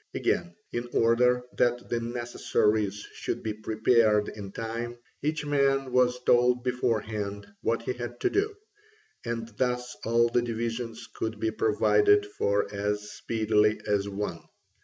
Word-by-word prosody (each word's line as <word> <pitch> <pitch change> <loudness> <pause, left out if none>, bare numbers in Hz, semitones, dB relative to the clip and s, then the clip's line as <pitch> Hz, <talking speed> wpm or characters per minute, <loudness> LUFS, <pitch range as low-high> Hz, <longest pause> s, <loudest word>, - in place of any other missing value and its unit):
Again, 85 - 0 0.2
in 120 0 -3
order 125 +2 +3 0.2
that 120 0 +1
the 120 - 0
necessaries 115 -3 0
should - - -4
be 110 - -2
prepared 110 0 +2
in 100 -2 -8
time, 115 +2 -4 0.2
each 150 +1 -1
man 135 -2 +2
was 125 0 +2
told 125 0 +4
beforehand 110 -5 -1 0.2
what 115 0 0
he 125 - -1
had 120 0 -6
to - - +2
do: 410 +1 0 0.7
and 115 -1 -3
thus 125 -1 -1
all 115 +1 +3
the 120 +1 +2
divisions 115 0 -4
could 110 -1 -4
be 110 0 0
provided 410 - +3
for 105 - 0
as 105 +1 -2
speedily 105 -1 +1
as 100 -1 0
one. 100 -4 -3
115 Hz, 140 wpm, -28 LUFS, 105-125 Hz, 0.7 s, told